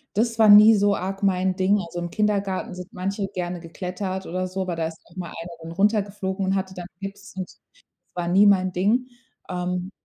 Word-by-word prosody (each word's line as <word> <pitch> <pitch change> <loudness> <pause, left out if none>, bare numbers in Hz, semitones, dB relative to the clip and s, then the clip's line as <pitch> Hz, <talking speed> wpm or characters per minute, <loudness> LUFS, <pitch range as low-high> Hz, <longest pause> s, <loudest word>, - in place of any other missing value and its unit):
Das 230 +1 +1
war 220 -2 +6
nie 215 +2 +9
so 205 0 +3
arg 195 +2 -4
mein 185 -1 +2
Ding. 195 +2 +2
Also, 175 +1 -6
im 175 0 -4
Kindergarten 200 -1 -1
sind 180 0 -9
manche 195 +2 -3
gerne 180 -2 -4
geklettert 185 +2 -5
oder 185 +2 -2
so, 185 +1 -4
aber 180 -2 -3
da 165 -1 -1
ist 160 - -10
auch 170 - -21
mal 180 -2 -5
einer 170 +1 -8
dann 165 +1 -8
runtergeflogen 200 0 0
und 190 - +1
hatte 190 -1 -2
dann 180 -1 -7
Gips 200 +2 -8
und 185 - -4
so. - - -19 0.3
Das - - -48
war - - -3
nie 195 +3 +5
mein 185 -2 +4
Ding. 215 +8 +1 0.4
Ähm, 180 +1 -3
190 Hz, 215 wpm, -24 LUFS, 180-200 Hz, 0.4 s, nie